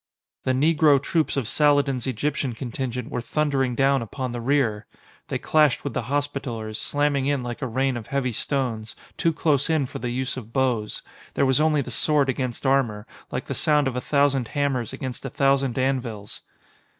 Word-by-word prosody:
The 130 Hz, -, +2 dB
Negro 150 Hz, +1 st, +4 dB
troops 155 Hz, +2 st, 0 dB
of 130 Hz, -6 st, -1 dB
Saladin's 145 Hz, -4 st, +2 dB
Egyptian 130 Hz, +1 st, -1 dB
contingent 125 Hz, 0 st, -4 dB
were 120 Hz, -, -2 dB
thundering 135 Hz, -1 st, 0 dB
down 135 Hz, 0 st, +3 dB
upon 125 Hz, +3 st, -4 dB
the 120 Hz, 0 st, -4 dB
rear! 115 Hz, -5 st, +1 dB, 0.4 s
They -, -, -2 dB
clashed 150 Hz, -5 st, +2 dB
with -, -, -4 dB
the 125 Hz, -, -1 dB
Hospitallers, 125 Hz, -4 st, -3 dB
slamming 145 Hz, -2 st, +1 dB
in 140 Hz, -3 st, 0 dB
like 120 Hz, -1 st, -5 dB
a 130 Hz, -, -1 dB
rain 130 Hz, +2 st, 0 dB
of 115 Hz, -3 st, -6 dB
heavy 135 Hz, -2 st, -1 dB
stones, 115 Hz, -3 st, -2 dB, 0.2 s
too 165 Hz, -, +1 dB
close 150 Hz, -3 st, +1 dB
in 155 Hz, -4 st, +2 dB
for -, -, -7 dB
the 125 Hz, -, -3 dB
use 130 Hz, +2 st, -2 dB
of 115 Hz, -3 st, -8 dB
bows. 120 Hz, -5 st, -1 dB, 0.3 s
There -, -, +3 dB
was 130 Hz, +2 st, +3 dB
only 155 Hz, -2 st, +3 dB
the -, -, -8 dB
sword 150 Hz, -3 st, +2 dB
against 130 Hz, 0 st, -2 dB
armor, 120 Hz, -6 st, +1 dB, 0.3 s
like -, -, -3 dB
the -, -, -4 dB
sound 150 Hz, -2 st, +3 dB
of 130 Hz, -, -2 dB
a 125 Hz, -, -1 dB
thousand 140 Hz, -4 st, +2 dB
hammers 135 Hz, -5 st, -1 dB
against 130 Hz, -2 st, -6 dB
a 135 Hz, -, -4 dB
thousand 135 Hz, -2 st, +1 dB
anvils. 125 Hz, -6 st, -2 dB
135 Hz, 185 wpm, -24 LUFS, 120-145 Hz, 0.4 s, Negro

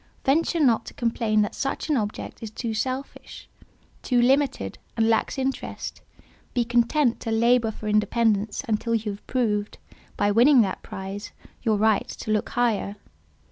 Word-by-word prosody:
Venture 330 Hz, +5 st, +2 dB
not 250 Hz, -7 st, +3 dB
to -, -, -9 dB
complain 225 Hz, -2 st, +1 dB
that 205 Hz, -, -3 dB
such 275 Hz, -, -3 dB
an 305 Hz, -, +2 dB
object 210 Hz, -4 st, -4 dB
is 225 Hz, -, -5 dB
too 225 Hz, +1 st, -4 dB
selfish, 260 Hz, +5 st, -5 dB, 0.5 s
too 250 Hz, -2 st, +1 dB
limited, 260 Hz, -, +1 dB, 0.2 s
and 225 Hz, -1 st, +3 dB
lacks 225 Hz, +4 st, +1 dB
interest; 265 Hz, 0 st, -4 dB, 0.5 s
be 240 Hz, -1 st, +2 dB
content 240 Hz, +2 st, +2 dB
to -, -, -5 dB
labour 230 Hz, +1 st, +3 dB
for 215 Hz, 0 st, -7 dB
independence 210 Hz, 0 st, +1 dB
until 230 Hz, +1 st, 0 dB
you 220 Hz, -1 st, -1 dB
have 200 Hz, -, -11 dB
proved, 210 Hz, -5 st, -1 dB, 0.4 s
by 205 Hz, -, +2 dB
winning 245 Hz, +5 st, +6 dB
that 190 Hz, -4 st, -1 dB
prize, 195 Hz, +2 st, -7 dB, 0.3 s
your 220 Hz, -2 st, +1 dB
right 215 Hz, 0 st, +2 dB
to 215 Hz, -, -5 dB
look 215 Hz, -1 st, 0 dB
higher. 225 Hz, -4 st, 0 dB
225 Hz, 155 wpm, -25 LUFS, 210-250 Hz, 0.5 s, winning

